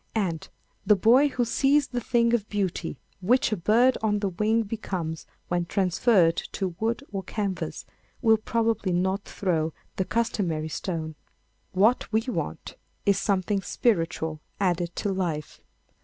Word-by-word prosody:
And, 180 -7 -1 0.3
the 210 +1 +5
boy 240 +9 +5
who 250 -3 0
sees 280 +4 +2
the 245 -1 -2
thing 235 0 +2
of 215 -3 0
beauty 190 -4 -2 0.2
which 225 +6 +2
a - - +2
bird 230 +8 +3
on 210 -1 +1
the 200 -1 -1
wing 215 +5 +1
becomes 185 -7 -4 0.2
when 175 -1 -1
transferred 185 -2 +3 0.2
to 190 -2 -1
wood 230 +5 -1
or 195 -2 -3
canvas 200 -1 -4 0.3
will 225 -2 +4
probably 225 -3 0
not 190 +3 0
throw 165 -5 -1 0.2
the 190 - 0
customary 180 -9 -1
stone. 160 -2 -4 0.6
What 215 +7 +3
we 220 0 +3
want 250 +2 -4 0.3
is 200 -2 +3
something 195 0 0
spiritual 165 -7 0 0.2
added 175 -3 0
to 200 - -1
life. 165 -5 -3
200 Hz, 140 wpm, -26 LUFS, 175-225 Hz, 0.6 s, the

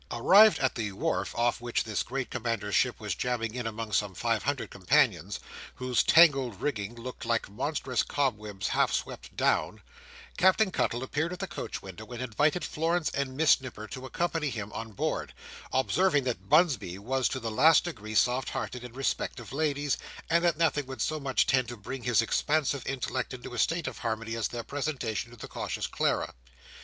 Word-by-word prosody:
Arrived 200 - +6
at 130 - +1
the 110 -3 -3
wharf - - -1
off 120 0 +1
which 120 -1 0
this 105 -2 -2
great 135 0 -4
commander's 115 -4 -2
ship - - +2
was - - -2
jammed 125 -2 -2
in 120 -2 -3
among 110 0 -5
some 105 -2 0
five 115 +2 0
hundred 140 0 -2
companions, 95 -2 +2 0.4
whose 125 -1 +1
tangled 135 - +5
rigging 115 -6 -2
looked 120 +1 -8
like 115 -1 0
monstrous 130 +2 -1
cobwebs 105 -8 -2
half - - +2
swept - - -4
down, - - +1 0.6
Captain 190 +2 +4
Cuttle 120 -6 0
appeared 155 +5 -1
at - - -6
the 195 - -3
coach - - -6
window, 100 +3 -9
and 120 -1 -7
invited 145 +7 +1
Florence 165 +1 0
and 135 -2 -3
Miss 160 -3 +5
Nipper 110 -4 -8
to 130 0 -7
accompany 165 +1 -1
him 105 -5 -5
on 115 0 -6
board; - - -2 0.4
observing 140 - +2
that 125 -2 -4
Bunsby 150 - +3
was 130 +6 0
to 130 - -3
the 115 -3 -4
last 155 +9 +6
degree 110 -11 -6
soft 125 +4 +2
hearted 125 -1 -4
in 125 -1 -9
respect 135 +1 -2
of - - -10
ladies, 145 -1 0 0.3
and 170 +1 +4
that 170 -3 +2
nothing 155 -4 +1
would 130 0 -3
so 155 -1 -1
much 135 -2 +1
tend 130 -2 +2
to 120 0 -7
bring 125 +6 -6
his 115 -2 +3
expansive 145 +2 0
intellect 130 -1 -2
into 125 0 -9
a 120 - -4
state 165 +9 +1
of - - -5
harmony 115 -1 -3
as 115 - 0
their 120 -1 -5
presentation 130 -6 -3
to 120 - -14
the - - -8
Cautious - - -3
Clara. - - 0
130 Hz, 190 wpm, -29 LUFS, 115-145 Hz, 0.6 s, Arrived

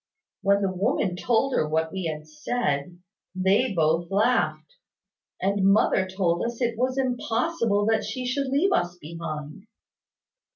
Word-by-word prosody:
When 200 +1 +3
the 195 - +1
woman 185 0 0
told 245 +7 +1
her 155 - +1
what 160 +1 0
we 190 -2 -4
had 155 -1 -4
said, 155 -1 -2 0.4
they 195 +7 +2
both 165 -1 +1
laughed; 245 - 0 0.6
and 195 +1 0
mother 190 -2 +3
told 185 -2 0
us 235 0 -3
it 235 -2 0
was 255 +3 -1
impossible 240 -3 0
that 220 0 +2
she 250 +4 -4
should 275 +2 -1
leave 290 +9 +2
us 175 - 0
behind. 160 +2 -7
200 Hz, 140 wpm, -25 LUFS, 170-245 Hz, 0.6 s, When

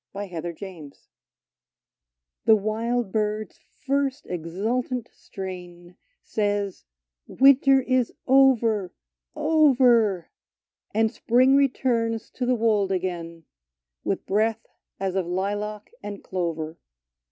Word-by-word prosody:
22 190 -4 -5
PERSEPHONE 170 -3 -8 1.6
'T^HE 220 -1 +6
wild 225 +1 -1
bird's 215 0 -2 0.3
first 275 0 0
exultant 220 +9 -3
strain 180 -2 -9 0.3
Says, 205 - -2 0.2
— - - -65
" - - -63
Winter 270 0 +5
is 255 -2 +1
over 235 -8 +4 0.2
— - - -50
over! 255 - +3 0.3
" - - -52
And 220 0 +3
spring 255 +3 +3
returns 235 -5 +1
to 250 - -3
the 250 - +3
wold 215 -4 +1
again, 170 -3 -4 0.6
With - - -2
breath 220 +2 0 0.3
as 195 -1 -1
of 190 -2 -1
lilac 205 +3 -3
and 205 0 -7
clover. 165 -3 -4
210 Hz, 105 wpm, -25 LUFS, 185-245 Hz, 1.6 s, T^HE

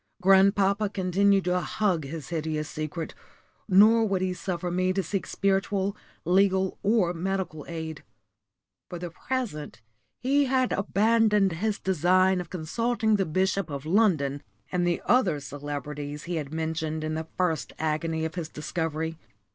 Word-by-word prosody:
Grandpapa 195 +2 +4
continued 195 0 +2
to 180 0 +2
hug 180 -4 0
his 150 0 -7
hideous 155 -2 -2
secret, 155 +2 -5 0.6
nor 215 +4 +6
would 195 -3 0
he 185 -1 0
suffer 180 -1 -3
me 185 +1 +1
to 195 +1 0
seek 190 +3 -3
spiritual, 195 0 0 0.3
legal, 190 +1 +2
or 200 -4 +2
medical 180 -3 -3
aid. 160 -2 -6 0.9
For 175 - -5
the 175 0 -6
present 205 - -4 0.4
he 280 +3 +2
had 255 -1 +1
abandoned 210 0 +3
his 205 +6 -1
design 185 +1 +2
of 175 - -9
consulting 220 +6 0
the 195 - 0
Bishop 190 +2 0
of 140 0 -5
London, 155 -7 +2 0.3
and 175 -1 +1
the 175 - 0
other 195 - +3
celebrities 145 +1 -6
he 170 0 -3
had 145 -2 -4
mentioned 160 -1 -2
in 155 0 -2
the 160 0 -4
first 180 -4 0
agony 160 +1 -1
of 160 - -4
his 170 -3 -5
discovery. 160 0 -3
180 Hz, 145 wpm, -27 LUFS, 160-195 Hz, 0.9 s, nor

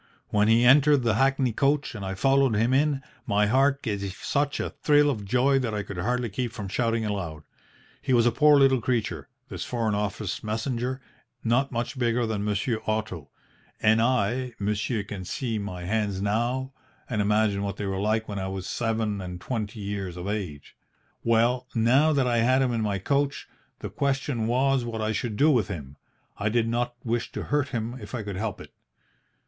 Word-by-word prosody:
When 105 0 +2
he 115 +2 +5
entered 145 +1 +6
the 115 -2 +2
hackney 135 +1 +2
coach 140 +4 +1
and 105 -3 -6
I 95 0 -3
followed 135 +3 +3
him 115 +4 +2
in, 140 0 +2 0.2
my 105 +1 +3
heart 135 +5 +2
gave 105 -5 -2
such 140 +8 -1
a - - -2
thrill 145 -1 +3
of 105 -6 -5
joy 130 +6 +3
that 115 -5 -2
I 105 - -2
could 100 -2 -7
hardly 120 +5 0
keep 115 +3 -3
from 105 -4 -6
shouting 115 +2 0
aloud. 85 -7 -4 0.6
He - - -3
was 120 -2 +4
a 120 - +4
poor 150 +4 +5
little 135 -3 +4
creature, 120 -1 -2 0.2
this - - -5
Foreign 115 -3 -1
Office 105 -1 -3
messenger, 120 +4 -2 0.4
not 125 +4 +1
much 120 +3 -3
bigger 120 0 +1
than 110 -2 -2
Monsieur 105 +3 -1
Otto, 105 -9 -2 0.5
and 110 +1 +4
I 125 +1 +1
monsieur 105 +2 -1
can 100 -2 -7
see 115 +4 -3
my 90 -3 -5
hands 100 0 -1
now, 120 +6 -1 0.3
and 110 -4 -1
imagine 105 -1 +2
what 100 -1 -3
they 105 - -3
were 95 0 -2
like 110 +2 0
when 100 -2 -4
I 95 - -3
was 95 -1 -5
seven 110 -3 -1
and 90 -1 -6
twenty 110 0 -4
years 100 -3 -4
of 90 +2 -5
age. 95 -9 -5 0.5
"Well, 120 +2 +2
now 130 +7 +4
that 140 -3 +2
I 120 -1 +1
had 130 +3 +3
him 125 -2 0
in 115 - 0
my 105 -2 0
coach, 140 +7 -1 0.3
the - - -4
question 135 -4 -1
was 130 +2 +2
what 115 -1 -4
I 110 - 0
should 110 -1 -3
do 155 +5 +5
with 120 -8 +2
him. 70 -8 -7 0.4
I 105 +1 +1
did 115 +1 +1
not 120 +1 -1
wish 120 0 -2
to - - -4
hurt 145 -1 0
him 120 -1 -4
if 105 +1 -7
I 115 - -3
could 100 -2 -5
help 105 -1 -3
it. - - -12
115 Hz, 195 wpm, -26 LUFS, 105-130 Hz, 0.6 s, entered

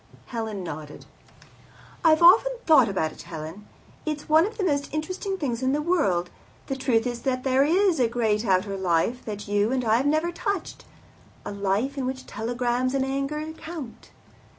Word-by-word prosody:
Helen 220 -5 -4
nodded. 150 -3 -8 1.0
"I've 320 0 +5
often 440 +8 +7
thought 270 -8 +6
about 160 -5 -1
it, - - -12
Helen. 165 +5 -8 0.4
It's 305 -2 -4
one 315 +4 +5
of 445 - -9
the 405 - -1
most 285 -5 0
interesting 370 +5 -3
things 255 -8 -2
in 260 +1 +1
the 295 - +1
world. 195 - +1 0.3
The 270 - -3
truth 255 -4 +1
is 240 -1 -3
that 255 -2 -1
there 265 0 +3
is 350 +2 +3
a 245 - +4
great 225 -2 0
outer 195 -1 +1
life 190 +6 0
that 210 -1 -6
you 205 +2 +1
and 255 -2 0
I 220 0 +4
have 265 +4 0
never 310 +4 +1
touched 385 +1 -4 0.6
a - - -4
life 205 +8 -1
in 255 - -1
which 260 0 -5
telegrams 245 +3 -1
and 265 -1 +1
anger 275 +3 -2
count. 310 -8 -9
255 Hz, 175 wpm, -25 LUFS, 210-310 Hz, 1.0 s, often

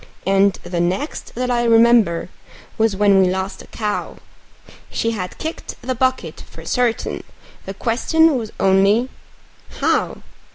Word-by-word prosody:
And 195 +1 +3
the 175 0 -3
next 185 - -3
that 250 +1 -1
I 240 -1 +1
remember 230 -7 +4 0.5
was 220 -2 +1
when 200 -1 +4
we 185 - +3
lost 190 +1 -3
a - - -14
cow; 210 -2 -4 0.7
She 230 - -1
had 185 -5 -5
kicked 320 +1 -6
the 255 - -1
bucket 260 +1 -1
for - - -12
certain, 245 -2 -1 0.4
the 195 - -5
question 305 - +2
was 225 -4 -4
only 195 +6 +3 0.7
How? - - 0
220 Hz, 135 wpm, -20 LUFS, 195-245 Hz, 0.7 s, remember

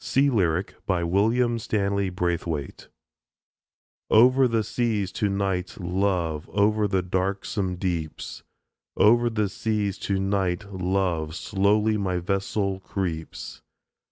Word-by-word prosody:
SEA 140 +1 +2
LYRIC 90 -4 +1
WILLIAM 105 +7 +2
STANLEY 100 -2 0
BRAITHWAITE 85 -5 -3 1.2
Over 130 +4 +6
the 115 -2 +1
seas 105 -4 -1
to 105 -3 0
night, 95 -2 -2
love, 90 -4 -1
Over 105 +1 +2
the 95 -2 0
darksome 95 +1 -1
deeps, 85 -4 -4 0.6
Over 120 +3 +5
the 105 -2 0
seas 105 -1 -2
to 100 -1 -1
night, 95 0 0
love, 90 -4 -1
Slowly 105 +3 +2
my 95 -3 -1
vessel 100 +2 -1
creeps. 90 -5 -5
100 Hz, 105 wpm, -25 LUFS, 90-105 Hz, 1.2 s, Over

